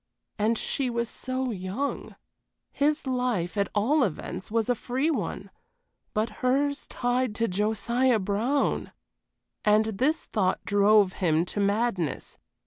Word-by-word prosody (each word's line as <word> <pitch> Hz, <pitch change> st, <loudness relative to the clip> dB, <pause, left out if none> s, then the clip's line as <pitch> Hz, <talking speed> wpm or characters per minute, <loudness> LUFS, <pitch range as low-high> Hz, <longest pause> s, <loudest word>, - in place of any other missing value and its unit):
And 220 Hz, +2 st, +2 dB
she 265 Hz, +3 st, -1 dB
was 235 Hz, 0 st, -1 dB
so 255 Hz, +1 st, -3 dB
young. 200 Hz, +8 st, -4 dB, 0.6 s
His 295 Hz, +1 st, +1 dB
life, 250 Hz, -9 st, -1 dB
at 200 Hz, -1 st, 0 dB
all 260 Hz, +8 st, +3 dB
events, 185 Hz, 0 st, -4 dB
was 225 Hz, 0 st, 0 dB
a 250 Hz, -, +3 dB
free 260 Hz, +6 st, -1 dB
one; -, -, -3 dB, 0.6 s
but 215 Hz, +2 st, +1 dB
hers 280 Hz, +3 st, +1 dB
tied 245 Hz, -2 st, 0 dB
to 230 Hz, +1 st, +1 dB
Josiah 225 Hz, +5 st, +1 dB
Brown! 215 Hz, +8 st, 0 dB, 0.7 s
And 215 Hz, 0 st, +4 dB
this 305 Hz, +5 st, +1 dB
thought 190 Hz, -3 st, 0 dB
drove 205 Hz, -1 st, +4 dB
him 165 Hz, -2 st, +1 dB
to 205 Hz, -, -5 dB
madness. 200 Hz, -, -1 dB
230 Hz, 130 wpm, -27 LUFS, 200-255 Hz, 0.7 s, And